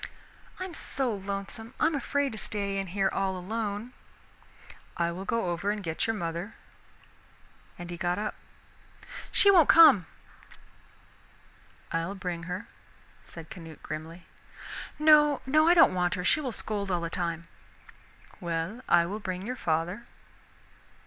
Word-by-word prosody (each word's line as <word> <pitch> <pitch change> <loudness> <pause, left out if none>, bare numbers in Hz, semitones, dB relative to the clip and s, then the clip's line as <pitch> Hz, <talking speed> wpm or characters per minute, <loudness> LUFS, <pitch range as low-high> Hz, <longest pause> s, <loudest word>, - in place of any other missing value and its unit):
"I'm 370 -1 -5
so 265 -6 0
lonesome, 200 +3 -6
I'm 320 +1 +3
afraid 285 0 0
to 220 - -6
stay 200 -1 -2
in 195 - -3
here 195 +2 0
all 190 -1 -1
alone." 210 +4 -4 1.0
"I 170 0 +1
will 185 +3 -6
go 200 -4 0
over 175 +4 -2
and 210 -1 -2
get 165 +3 -2
your 225 - 0
mother." 170 +2 -4 1.2
And 175 0 -8
he 175 - -5
got 175 +1 -1
up. 215 +1 -2 1.0
"She 400 - +6
won't 345 -6 +6
come." 310 - +8 1.8
"I'll 165 +4 -2
bring 180 -3 -5
her," 185 +6 -5 0.6
said 165 -2 -11
Canute 165 -3 -10
grimly. 165 +3 -7 0.7
"No, 300 -1 +5
no. 310 +4 +4
I 345 - +6
don't 335 - +7
want 180 -1 +1
her, 180 - -4
she 305 - +3
will 260 -4 -3
scold 205 -3 -3
all 175 -2 0
the 170 0 -4
time." 170 -2 -2 0.9
"Well, 170 +5 -3
I 170 -1 +5
will 200 +5 -4
bring 185 -2 -5
your 250 +3 -3
father." 175 +4 -2
195 Hz, 140 wpm, -28 LUFS, 175-230 Hz, 1.8 s, come